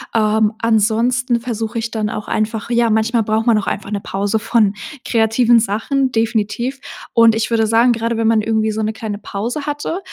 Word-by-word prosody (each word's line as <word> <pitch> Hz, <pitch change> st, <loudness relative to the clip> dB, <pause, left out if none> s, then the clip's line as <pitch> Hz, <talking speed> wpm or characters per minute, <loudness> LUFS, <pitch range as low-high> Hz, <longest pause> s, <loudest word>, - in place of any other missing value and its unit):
Ähm, 215 Hz, 0 st, +2 dB
ansonsten 230 Hz, +3 st, +1 dB
versuche 230 Hz, -1 st, -3 dB
ich 230 Hz, 0 st, -4 dB
dann 215 Hz, -2 st, -2 dB
auch 210 Hz, -, -6 dB
einfach 220 Hz, +1 st, -2 dB
ja, 235 Hz, -1 st, +2 dB
manchmal 220 Hz, +1 st, +1 dB
braucht 220 Hz, +1 st, 0 dB
man 230 Hz, -3 st, +4 dB
auch 200 Hz, -, -3 dB
einfach 200 Hz, +1 st, -4 dB
'ne 205 Hz, -, -1 dB
Pause 200 Hz, +3 st, -2 dB
von 215 Hz, -2 st, +2 dB, 0.3 s
kreativen 230 Hz, +1 st, +3 dB
Sachen, 245 Hz, +5 st, -1 dB
definitiv. 225 Hz, +3 st, -1 dB, 0.3 s
Und 230 Hz, -1 st, +5 dB
ich 225 Hz, -, -1 dB
würde 225 Hz, -1 st, +1 dB
sagen, 230 Hz, +2 st, +4 dB
gerade 230 Hz, 0 st, -1 dB
wenn 225 Hz, 0 st, 0 dB
man 225 Hz, -1 st, +3 dB
irgendwie 220 Hz, 0 st, 0 dB
so 220 Hz, +1 st, -3 dB
'ne 215 Hz, +1 st, -1 dB
kleine 215 Hz, -2 st, -5 dB
Pause 230 Hz, +8 st, -5 dB
hatte, 295 Hz, +4 st, -3 dB
225 Hz, 190 wpm, -18 LUFS, 215-235 Hz, 0.3 s, Und